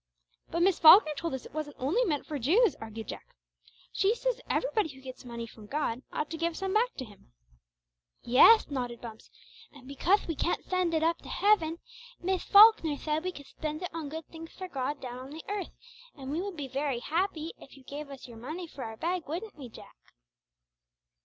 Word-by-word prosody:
"But 340 +1 0
Miss 375 -1 +3
Falkner 315 0 +9
told 330 -1 -3
us 260 - -8
it - - -12
wasn't 300 -2 -4
only 315 - +1
meant 300 -8 -1
for 295 -2 -4
Jews," 385 - +3
argued 220 0 -7
Jack. - - -9 0.6
"She 405 +4 +2
says - - -2
everybody 435 -8 0
who 265 -2 -12
gets 260 0 -10
money 235 -1 -6
from 220 -2 -14
God 260 -3 -2
ought 300 - -2
to 325 - -4
give 335 +1 -1
back - - -9
some 385 +1 -2 0.2
to 260 - -4
Him." 205 - -18 0.9
"Yeth," 285 - +6
nodded 245 -3 -3
Bumps; 225 -2 -10 0.4
"and 270 -3 -15
becauth 345 +9 +1
we 330 - -1
can't 345 - -1
send 365 -3 0
it 315 - +1
up 335 +1 +2
to - - -12
heaven, 335 -6 +2 0.4
Miss 370 +1 -1
Falkner 405 -8 +7
thaid 310 +2 -2
we 370 - -2
could 285 -5 -11 0.2
thpend 310 +2 -3
it 360 - -5
on 320 -3 -5
good 320 +1 -6
things 325 0 -10
for 375 - -7
God 280 -2 -3
down 250 -1 -7
on 260 +1 -9
the 310 +2 -9
earth, 405 -2 -3 0.5
and 270 -1 -7
we 320 +4 -1
would 390 -3 -5
be 285 -2 -4
very 275 0 -1
happy 325 +1 -2
if 275 - -15
you 270 - -16
gave 285 +2 -7
us 275 -2 -10
your 235 -2 -12
money 310 +10 -6
for 290 -5 -9
our 220 0 -7
bag, 345 +3 -2
wouldn't 365 +8 -5
we, 270 -5 -9
Jack?" - - -14
310 Hz, 210 wpm, -29 LUFS, 265-360 Hz, 0.9 s, Falkner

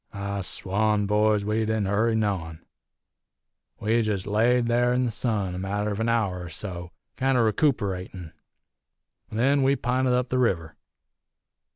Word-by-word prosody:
"I 100 0 -4
swan, 105 +3 0
boys, 105 0 +2
we 105 +1 0
didn't 110 -1 0
hurry 110 +4 +1
noane. 95 -7 -2 1.1
We 115 +2 +2
jest 105 -4 -2
laid 120 +4 +2
there 120 +1 +2
in 125 0 +1
the 120 - -1
sun 105 -5 -1
a 90 - -5
matter 105 +2 -2
of 100 - -4
an 115 +1 0
hour 100 -6 0
er - - -8
so, 85 0 -6 0.3
kinder 130 -3 +2
recooperatin'. 100 - -1 1.0
Then 135 +6 +2
we 135 +1 +3
pinted 125 0 0
up 125 0 0
river. 90 - 0
105 Hz, 145 wpm, -25 LUFS, 100-120 Hz, 1.1 s, we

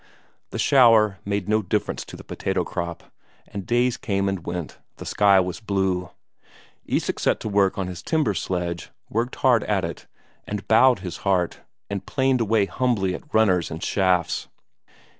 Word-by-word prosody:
The - - -6
shower 115 -7 +5
made 100 -2 -2
no 110 +1 +2
difference 95 - -2
to - - -10
the - - -11
potato - - -2
crop, 85 0 -5 0.4
and 100 -2 -7
days 120 +1 +2
came 100 -2 -1
and 95 -3 -2
went; 85 -3 -5 0.2
the - - -8
sky 100 -2 +4
was 90 +1 -2
blue. 95 -4 -1 0.8
Isak - - -1
set - - +1
to - - -4
work 100 -2 +2
on 95 - -1
his 90 -1 -6
timber 150 - +1
sledge, 85 -1 -3 0.2
worked 120 +4 -1
hard 120 -4 +3
at 100 -4 0
it, 85 -2 -7 0.4
and 105 -1 -5
bowed 125 +3 +5
his 90 -3 -5
heart, 95 -3 0 0.3
and 100 -1 -4
planed 130 0 +1
away 110 -2 +2
humbly 105 -5 0
at 150 - -9
runners 95 -6 +3
and 80 - -6
shafts. 90 -4 +1
100 Hz, 165 wpm, -24 LUFS, 90-110 Hz, 0.8 s, shower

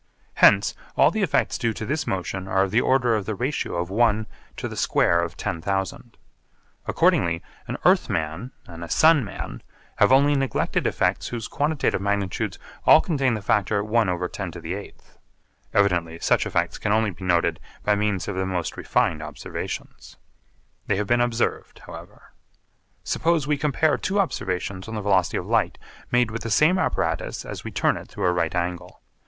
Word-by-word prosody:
Hence - - +5 0.2
all - - +5
the 220 - -2
effects 185 -7 +1
due 115 -2 0
to 110 - -6
this 150 +6 -2
motion 95 0 -3
are 95 0 +2
of 95 - -2
the 115 +4 +3
order 125 -3 +2
of 105 -3 -1
the 110 - -2
ratio 130 -3 -2
of 85 +1 -2
one 110 0 +2 0.3
to - - -3
the - - -7
square 85 - +2
of 85 0 -5
10,000. 95 +3 -3 0.7
Accordingly 85 -1 +2 0.2
an - - -4
earth - - +4
man 80 +11 -3
and 85 -1 -9
a 85 - -8
sun 160 -3 +5
man 100 - -7 0.4
have - - +4
only 140 +2 +5
neglected 135 -2 0
effects - - 0
whose 115 -3 -5
quantitative 145 -7 0
magnitudes 100 -1 -1 0.3
all - - +8
contain 135 -7 0
the 105 - -6
factor 105 0 +1
1/10⁸. 100 -5 -2 0.8
Evidently 85 -5 +1
such - - +1
effects - - -1
can - - -1
only 110 -1 +2
be 90 +1 -12
noted 85 -2 +1 0.2
by 105 - +3
means 105 -2 -1
of 105 - -3
the 95 0 -1
most 90 -4 -3
refined 80 -2 0
observations. 75 -1 -7 0.7
They 100 - +2
have 105 +2 -1
been 120 +3 +2
observed 120 -1 -1
however. - - -12 0.7
Suppose 165 -3 +1
we 150 +1 +1
compare 150 +1 +1
two 200 +2 -1
observations 95 - -2
on 110 - -6
the 105 - -3
velocity 95 -3 +2
of - - -4
light - - +1 0.3
made 120 -2 +2
with 115 - -5
the 115 - -4
same 155 - +4
apparatus - - -1
as - - -7
we - - -5
turn - - +1
it - - -9
through - - -4
a 90 - +3
right 85 -1 -1
angle. 90 0 -4
105 Hz, 170 wpm, -24 LUFS, 90-125 Hz, 0.8 s, all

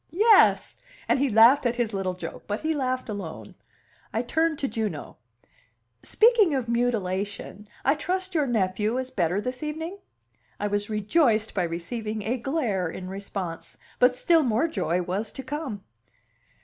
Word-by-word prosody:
Yes!" - - +4 0.3
and - - +2
he 280 0 +2
laughed 230 +6 +6
at 240 - -1
his 235 -3 -1
little 190 -2 -2
joke, 180 - -8
but 205 +1 -3
he 315 +1 0
laughed 255 -3 -2
alone. 200 -7 -7 0.6
I 225 - -1
turned 320 +5 +1
to 275 - -1
Juno. 215 - -4 0.8
"Speaking 440 - +4
of 255 -3 -2
mutilation, 210 -3 -2 0.2
I 275 - +5
trust 370 +3 -3
your 300 -4 +1
nephew 215 0 0
is 260 0 -4
better 180 -4 0
this 250 +3 -4
evening." 320 +5 -5 0.6
I 205 - -2
was 205 0 -1
rejoiced 220 +1 +2
by 190 - 0
receiving 210 +6 -4
a 245 +4 -1
glare 230 - -1
in 185 +2 -7
response. 190 -3 -6 0.2
But 250 0 +5
still 330 +5 +4
more 245 +3 +1
joy 180 - -1
was 195 +5 -3
to 270 - -7
come. 260 -7 -5
230 Hz, 155 wpm, -26 LUFS, 200-275 Hz, 0.8 s, laughed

